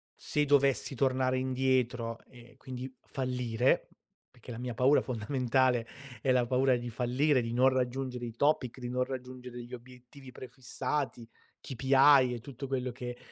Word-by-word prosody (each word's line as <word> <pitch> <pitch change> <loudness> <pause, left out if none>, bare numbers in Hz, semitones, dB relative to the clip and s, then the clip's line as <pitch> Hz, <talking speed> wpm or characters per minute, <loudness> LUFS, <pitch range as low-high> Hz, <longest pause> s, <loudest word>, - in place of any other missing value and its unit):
se 150 0 -1
dovessi 140 -1 +2
tornare 130 0 +1
indietro 130 -3 0
e 120 -1 -17
quindi 130 0 -7
fallire, 125 -2 0 0.4
perché 125 0 -16
la 115 - -6
mia 125 -1 -4
paura 130 +5 +4
fondamentale, 125 0 0 0.4
è 130 - +2
la 125 -1 +3
paura 130 0 +3
di 120 0 -5
fallire, 125 +4 +1
di 115 0 -4
non 130 +2 +5
raggiungere 130 -1 -2
i 115 - -6
topic, 140 -3 +1
di 120 -1 -5
non 125 0 0
raggiungere 125 -1 -7
gli 120 +1 -12
obiettivi 125 +2 -14
prefissati, 130 0 -4 0.3
KPI 135 0 +4
e 120 - -5
tutto 135 +2 -8
quello 130 -1 -2
che 125 0 -7
125 Hz, 150 wpm, -30 LUFS, 120-130 Hz, 0.4 s, non